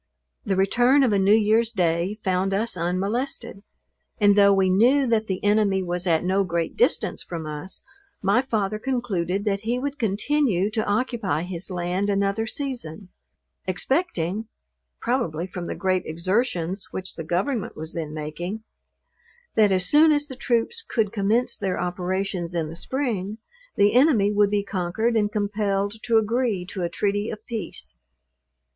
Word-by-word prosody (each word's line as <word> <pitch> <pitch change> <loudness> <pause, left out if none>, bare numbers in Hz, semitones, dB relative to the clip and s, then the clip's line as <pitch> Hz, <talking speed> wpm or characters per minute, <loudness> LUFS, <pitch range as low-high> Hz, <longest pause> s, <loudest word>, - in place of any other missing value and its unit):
The 200 -5 0
return 245 +8 +4
of 240 -5 +3
a 200 - +3
new 195 +2 +5
year's 220 +1 +3
day 175 0 0
found 190 0 +1
us 220 +2 -1
unmolested; 195 +6 -2 0.6
and 205 -1 +5
though 200 -1 +6
we 195 -1 +3
knew 240 +9 +4
that 225 -3 +1
the 190 -1 -3
enemy 205 -2 +2
was 180 +1 -3
at 165 -1 +2
no 190 +2 +2
great 170 -2 -2
distance 475 - +1
from 165 -2 -6
us, 155 +5 -6 0.4
my 200 +6 +3
father 215 -5 -1
concluded 205 -7 -1
that 200 -1 +1
he 230 +4 -1
would 285 +3 -4
continue 215 -2 +1
to 220 0 0
occupy 205 - 0
his 180 0 -4
land 180 +2 -1
another 200 +2 0
season: 220 - -5 0.6
expecting 210 - -1 0.5
(probably 175 -10 -1
from 180 -2 -6
the - - -4
great 185 -1 +1
exertions 185 +1 -1
which 190 0 -5
the 165 - -6
government 195 - -1
was 160 +1 -5
then 160 -3 -4
making) 170 +8 -5 0.9
that 210 -2 +4
as 185 -1 +2
soon 305 - +6
as 290 -1 +2
the 260 - -8
troops 250 - 0
could 220 - -1
commence 220 +4 +1
their 190 -3 -1
operations 180 0 -2
in 160 -2 -1
the 165 - -8
spring, 215 -2 -3 0.4
the 205 +1 +4
enemy 245 -6 +4
would 205 -1 +3
be 205 0 0
conquered 200 +5 -1
and 210 -2 +2
compelled 205 0 -1
to 230 -2 +2
agree 220 -3 0
to 185 +1 -6
a 170 - -1
treaty 205 +3 -1
of 215 0 -7
peace. 225 -3 -6
200 Hz, 160 wpm, -24 LUFS, 180-225 Hz, 0.9 s, though